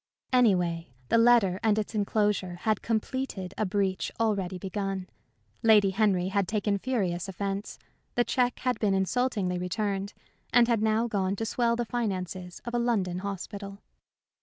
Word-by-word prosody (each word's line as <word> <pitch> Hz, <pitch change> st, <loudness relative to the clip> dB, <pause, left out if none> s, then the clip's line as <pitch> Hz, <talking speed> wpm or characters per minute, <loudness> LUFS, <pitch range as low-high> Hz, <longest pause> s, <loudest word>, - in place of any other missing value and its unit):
Anyway, 180 Hz, -9 st, +3 dB, 0.2 s
the -, -, +4 dB
letter 230 Hz, -6 st, +5 dB
and 215 Hz, -1 st, +2 dB
its 215 Hz, +1 st, -2 dB
enclosure 205 Hz, -3 st, 0 dB
had 215 Hz, -2 st, +1 dB
completed 220 Hz, -4 st, -2 dB
a 215 Hz, -, -1 dB
breach 195 Hz, -1 st, -1 dB
already 200 Hz, -5 st, 0 dB
begun. 195 Hz, 0 st, -3 dB, 0.5 s
Lady 210 Hz, -4 st, +5 dB
Henry 190 Hz, -3 st, +2 dB
had 195 Hz, -1 st, 0 dB
taken 205 Hz, -1 st, 0 dB
furious 195 Hz, -7 st, -1 dB
offence; 195 Hz, +2 st, -4 dB, 0.4 s
the 240 Hz, -, +4 dB
check 245 Hz, 0 st, +1 dB
had 250 Hz, -3 st, 0 dB
been 200 Hz, -3 st, +2 dB
insultingly 190 Hz, -2 st, 0 dB
returned, 200 Hz, +2 st, -2 dB, 0.4 s
and 240 Hz, -1 st, +5 dB
had 230 Hz, -3 st, +2 dB
now 220 Hz, +1 st, +2 dB
gone 195 Hz, -3 st, 0 dB
to 225 Hz, -, -3 dB
swell 235 Hz, +1 st, +1 dB
the 240 Hz, 0 st, -1 dB
finances 185 Hz, -6 st, -4 dB
of 235 Hz, -, -5 dB
a 240 Hz, -, +1 dB
London 200 Hz, -7 st, 0 dB
hospital. 200 Hz, +1 st, -6 dB
205 Hz, 150 wpm, -28 LUFS, 190-225 Hz, 0.5 s, letter